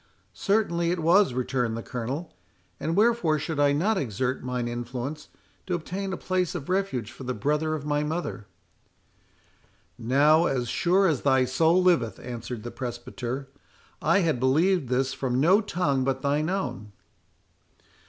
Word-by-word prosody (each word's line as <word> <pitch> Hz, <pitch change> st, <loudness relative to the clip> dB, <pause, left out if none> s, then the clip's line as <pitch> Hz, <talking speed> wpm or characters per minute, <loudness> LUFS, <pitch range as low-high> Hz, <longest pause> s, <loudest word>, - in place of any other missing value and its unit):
"Certainly 185 Hz, -5 st, +1 dB
it 180 Hz, -, 0 dB
was," 170 Hz, -2 st, +4 dB
returned 125 Hz, -3 st, -1 dB
the 115 Hz, -, -5 dB
Colonel.—"And 125 Hz, -, -6 dB
wherefore 210 Hz, -7 st, +3 dB
should 155 Hz, 0 st, -3 dB
I 145 Hz, -1 st, +4 dB
not 190 Hz, +8 st, +1 dB
exert 130 Hz, +1 st, -2 dB
mine 125 Hz, -1 st, -2 dB
influence 125 Hz, +5 st, -5 dB, 0.4 s
to 180 Hz, -, 0 dB
obtain 190 Hz, +4 st, -4 dB
a -, -, -3 dB
place 185 Hz, -2 st, -1 dB
of 150 Hz, -3 st, -6 dB
refuge 185 Hz, -, -1 dB
for 135 Hz, -, -11 dB
the 125 Hz, 0 st, -3 dB
brother 150 Hz, +6 st, 0 dB
of 145 Hz, -2 st, -6 dB
my 145 Hz, 0 st, 0 dB
mother?" 155 Hz, -, -4 dB, 1.5 s
"Now, 145 Hz, +8 st, +4 dB
as 125 Hz, -3 st, -1 dB
sure 185 Hz, +3 st, +2 dB
as 155 Hz, -8 st, +1 dB
thy 130 Hz, -2 st, +3 dB
soul 160 Hz, +8 st, +3 dB
liveth," 140 Hz, -, +2 dB
answered 120 Hz, -2 st, -6 dB
the 120 Hz, -, -6 dB
presbyter, 125 Hz, +2 st, -5 dB, 0.5 s
"I 170 Hz, +6 st, +3 dB
had 160 Hz, -8 st, +1 dB
believed 155 Hz, +3 st, +2 dB
this 130 Hz, +1 st, +1 dB
from 130 Hz, -2 st, -1 dB
no 185 Hz, +9 st, +5 dB
tongue 160 Hz, -10 st, 0 dB
but 135 Hz, 0 st, -1 dB
thine 145 Hz, +3 st, +1 dB
own. 180 Hz, -, -3 dB
145 Hz, 150 wpm, -26 LUFS, 125-175 Hz, 1.5 s, no